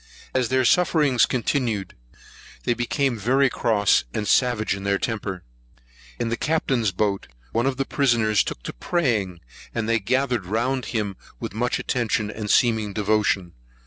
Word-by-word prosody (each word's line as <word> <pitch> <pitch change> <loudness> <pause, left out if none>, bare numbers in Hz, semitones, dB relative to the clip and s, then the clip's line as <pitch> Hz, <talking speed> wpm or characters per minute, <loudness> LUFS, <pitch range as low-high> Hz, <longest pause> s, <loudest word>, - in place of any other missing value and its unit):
As 130 -3 +1
their 130 0 +2
sufferings 150 -4 +3
continued, 120 - -1 0.7
they - - +2
became 120 0 -1
very 130 +5 +3
cross 105 - +2
and 105 - -2
savage 120 -2 +2
in 100 - -7
their 100 0 +1
temper. 100 -4 -4 0.7
In 120 - -2
the 115 - -1
Captain's 130 -9 0
boat, 100 +1 -1 0.2
one 120 - +1
of 135 -2 -1
the 135 - 0
prisoners 115 -8 +2
took - - -6
to - - -5
praying, 105 - -1 0.3
and 110 -1 -1
they 115 0 +2
gathered 125 -2 0
round 125 +5 -1
him 105 -5 -3 0.2
with - - -5
much 120 +3 0
attention 110 -3 -1
and 105 -1 -6
seeming 110 -5 +2
devotion. 100 -4 +1
115 Hz, 150 wpm, -23 LUFS, 105-130 Hz, 0.7 s, sufferings